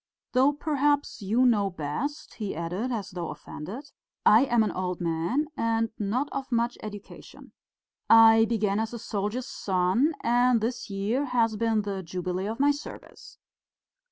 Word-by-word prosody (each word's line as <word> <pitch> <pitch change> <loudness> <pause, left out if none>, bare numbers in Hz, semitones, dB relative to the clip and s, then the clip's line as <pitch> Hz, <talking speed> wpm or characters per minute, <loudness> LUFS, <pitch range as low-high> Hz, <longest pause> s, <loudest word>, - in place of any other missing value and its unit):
Though 265 +3 +4
perhaps 290 -2 0
you 225 +6 +2
know 210 -5 +3
best," 185 - -4
he 205 -6 -5
added, 180 +10 -3
as 210 -5 -4
though 175 -2 -5
offended. 200 - -8 0.3
"I 225 +6 +7
am 240 -4 +3
an 215 - -1
old 180 -1 -3
man 170 - 0
and 225 0 0
not 225 +7 -1
of 275 -1 -5
much 235 0 +1
education. 205 -2 -10 0.6
I 225 0 +8
began 215 -3 0
as 225 +1 -3
a - - -4
soldier's 220 +2 -3
son, 190 - +1
and 245 0 +3
this 230 +1 -3
year 205 +8 -1
has 235 -4 +1
been 220 -1 +1
the 200 -1 -4
jubilee 180 +2 -4
of 225 +3 -4
my 285 +1 +4
service." 290 +1 -9
225 Hz, 155 wpm, -27 LUFS, 195-250 Hz, 0.6 s, I